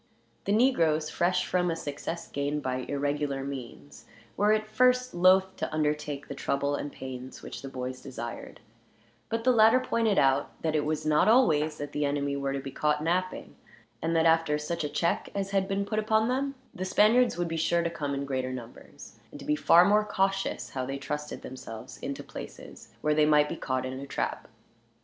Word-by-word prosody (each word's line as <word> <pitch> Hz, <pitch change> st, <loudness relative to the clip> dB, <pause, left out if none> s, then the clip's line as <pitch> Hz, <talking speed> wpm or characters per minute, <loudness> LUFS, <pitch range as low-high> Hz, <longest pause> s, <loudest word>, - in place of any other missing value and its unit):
The 200 Hz, -, 0 dB
negroes, 165 Hz, -, +3 dB
fresh 180 Hz, +1 st, +1 dB
from 180 Hz, -1 st, +1 dB
a 165 Hz, -, 0 dB
success 165 Hz, +2 st, -5 dB
gained 145 Hz, +1 st, -2 dB
by 130 Hz, 0 st, -1 dB
irregular 145 Hz, -1 st, -1 dB
means, 140 Hz, 0 st, -8 dB, 0.3 s
were 205 Hz, +1 st, +3 dB
at 215 Hz, 0 st, +2 dB
first 250 Hz, +3 st, +2 dB
loath 185 Hz, +2 st, +4 dB
to -, -, -3 dB
undertake 150 Hz, -2 st, -1 dB
the -, -, -5 dB
trouble 140 Hz, +1 st, -1 dB
and 145 Hz, 0 st, -3 dB
pains 130 Hz, -1 st, -8 dB
which -, -, -7 dB
the 135 Hz, -, -7 dB
boys 130 Hz, 0 st, -5 dB
desired; 120 Hz, -4 st, -7 dB, 0.7 s
but 230 Hz, 0 st, -2 dB
the 255 Hz, -, +5 dB
latter 225 Hz, +1 st, +6 dB
pointed 230 Hz, -5 st, +1 dB
out 135 Hz, +1 st, +2 dB
that 160 Hz, -1 st, 0 dB
it 150 Hz, -1 st, +1 dB
was 155 Hz, 0 st, -2 dB
not 150 Hz, +3 st, +3 dB
always 155 Hz, -, +4 dB
that 145 Hz, 0 st, -5 dB
the 150 Hz, -, -1 dB
enemy 140 Hz, 0 st, 0 dB
were 140 Hz, -1 st, -2 dB
to 140 Hz, -, -2 dB
be 135 Hz, 0 st, -7 dB
caught 150 Hz, +2 st, 0 dB
napping, 185 Hz, +3 st, -2 dB, 0.5 s
and 165 Hz, +1 st, 0 dB
that 165 Hz, 0 st, +3 dB
after 165 Hz, -2 st, +3 dB
such 155 Hz, +2 st, -3 dB
a 150 Hz, -, -2 dB
check 170 Hz, +3 st, 0 dB
as 195 Hz, -1 st, -2 dB
had 195 Hz, -1 st, +1 dB
been 200 Hz, +1 st, -1 dB
put 215 Hz, +1 st, -1 dB
upon 220 Hz, +1 st, +2 dB
them, 275 Hz, +2 st, -1 dB, 0.2 s
the 185 Hz, -, -5 dB
Spaniards 215 Hz, +4 st, +4 dB
would 175 Hz, -1 st, -1 dB
be 165 Hz, -, -3 dB
sure 170 Hz, +1 st, +1 dB
to 170 Hz, -, 0 dB
come 145 Hz, -4 st, -3 dB
in 140 Hz, 0 st, -3 dB
greater 130 Hz, -2 st, -2 dB
numbers, 120 Hz, -2 st, -10 dB
and -, -, -11 dB
to -, -, -9 dB
be 300 Hz, -, +2 dB
far 175 Hz, -, +6 dB
more 210 Hz, +2 st, +4 dB
cautious 195 Hz, -1 st, -1 dB
how 130 Hz, -, -3 dB
they 135 Hz, +2 st, -3 dB
trusted 150 Hz, +2 st, -5 dB
themselves 125 Hz, -4 st, -9 dB
into -, -, -5 dB
places -, -, -10 dB
where 150 Hz, -, +2 dB
they 150 Hz, 0 st, +4 dB
might 150 Hz, -1 st, +5 dB
be -, -, -3 dB
caught 130 Hz, -1 st, -2 dB
in 130 Hz, -, -4 dB
a 140 Hz, -, -7 dB
trap. -, -, -3 dB
155 Hz, 200 wpm, -28 LUFS, 140-195 Hz, 0.7 s, latter